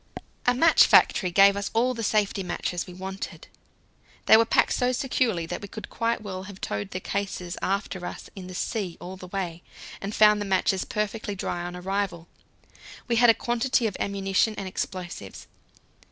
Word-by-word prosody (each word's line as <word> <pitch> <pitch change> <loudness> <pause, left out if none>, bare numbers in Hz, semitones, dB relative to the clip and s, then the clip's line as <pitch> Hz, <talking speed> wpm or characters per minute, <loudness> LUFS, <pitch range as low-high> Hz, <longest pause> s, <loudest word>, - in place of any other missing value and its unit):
A 245 - +4
match 325 +5 +6
factory 185 - +5
gave 195 +2 +6
us 200 0 -3
all 250 +3 +3
the 230 - -5
safety 210 -2 +1
matches 180 -1 -3
we 180 - -9
wanted. 190 +1 -7 0.8
They - - +8
were 225 +1 +6
packed - - +3
so 250 0 +1
securely 245 - 0
that - - -5
we 200 - -7
could 215 +2 -9
quite 230 0 -1
well 190 -2 -5
have 195 -1 -10
towed 105 0 -3
the 185 - -4
cases 190 -2 -4
after 195 -1 -2
us - - -8
in 185 -2 -8
the 185 - -8
sea 190 -4 -3
all 185 +1 -7
the 185 -1 -10
way, 180 -3 -4 0.4
and 200 +2 -4
found 210 -1 +6
the - - -2
matches 190 -1 +1
perfectly 210 0 -3
dry 175 -2 -3
on 175 0 -5
arrival. 180 -2 -3 0.8
We 235 -2 +1
had 240 0 +6
a 225 - +7
quantity 240 +2 0
of 205 -4 -1
ammunition 200 +2 0
and 195 - -4
explosives. 175 - -6
195 Hz, 180 wpm, -26 LUFS, 185-220 Hz, 0.8 s, They